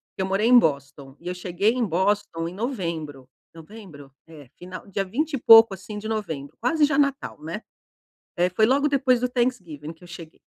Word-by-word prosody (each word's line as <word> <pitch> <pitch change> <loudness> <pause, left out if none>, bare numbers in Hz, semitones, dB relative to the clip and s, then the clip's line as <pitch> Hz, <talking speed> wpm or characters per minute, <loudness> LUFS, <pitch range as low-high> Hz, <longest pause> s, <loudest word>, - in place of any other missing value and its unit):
que - - -4
eu - - 0
morei 195 +4 0
em 250 0 +7
Boston, 140 - -3
e 175 - -12
eu 180 - -2
cheguei 180 +4 0
em 250 -2 -1
Boston 185 -2 -1
em 175 - -7
novembro, 165 - -5 0.2
"novembro"? 165 -5 -13 0.2
É, 150 -5 -14
final 185 +1 -10
dia 195 0 -2
vinte 290 +11 -3
e - - 0
pouco 225 -3 +7
assim 200 +3 -9
de 215 +1 -6
novembro, 160 -11 -5
quase 295 +6 +2
já 285 -1 -1
Natal, 280 - -1
né, 170 +8 -6 0.8
eh, 180 +1 +2
foi 215 +4 +2
logo 280 +4 +2
depois 260 -3 +2
do 250 - 0
Thanksgiving 180 - -3
que 165 - -22
eu - - -13
cheguei 165 -3 -12
190 Hz, 200 wpm, -24 LUFS, 165-235 Hz, 0.8 s, em